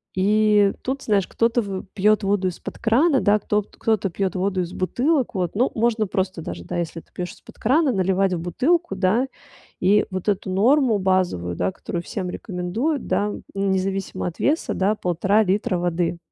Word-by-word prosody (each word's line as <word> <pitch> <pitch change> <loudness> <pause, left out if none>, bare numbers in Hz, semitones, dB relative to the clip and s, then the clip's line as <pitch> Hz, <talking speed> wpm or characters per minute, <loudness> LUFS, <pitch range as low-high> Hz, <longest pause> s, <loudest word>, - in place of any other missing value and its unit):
И 210 +1 +4
тут, 270 +2 -3
знаешь, 200 -6 +1
кто-то 230 +1 +1
вы 195 -3 -5
пьет 210 +2 +3
воду 195 -1 +1
из 180 - -4
под - - -8
крана, 265 +6 +3
да, 205 -2 +4
кто 210 0 0
пт 205 - -19
кто-то 215 -3 +1
пьет 190 +2 -2
воду 185 0 0
из 175 -1 -4
бутылок. 255 - 0
Вот, 180 -2 -2
ну 245 +5 +2
можно 225 -2 +1
просто 185 -2 -2
даже, 90 - -6
да, - - -5
если 170 -1 -3
ты - - -32
пьешь 180 0 -4
из - - -19
под - - -16
крана, 275 +5 +3
наливать 190 -1 +1
в 175 - -1
бутылку, 250 - 0
да? 200 +7 +2 0.5
И 205 +3 +4
вот 185 +2 -2
эту 195 -1 -1
норму 230 +4 +3
базовую, 185 - 0
да, 90 +1 0
которую 170 - -5
всем 180 +1 -4
рекомендуют, 220 - -3
да, 205 0 0 0.2
независимо 195 -1 -1
от 170 - -7
веса, 310 +4 +1
да- 200 +3 +1
1,5 195 +3 +2
литра 190 -1 0
воды. 175 0 -1
195 Hz, 190 wpm, -23 LUFS, 185-220 Hz, 0.5 s, И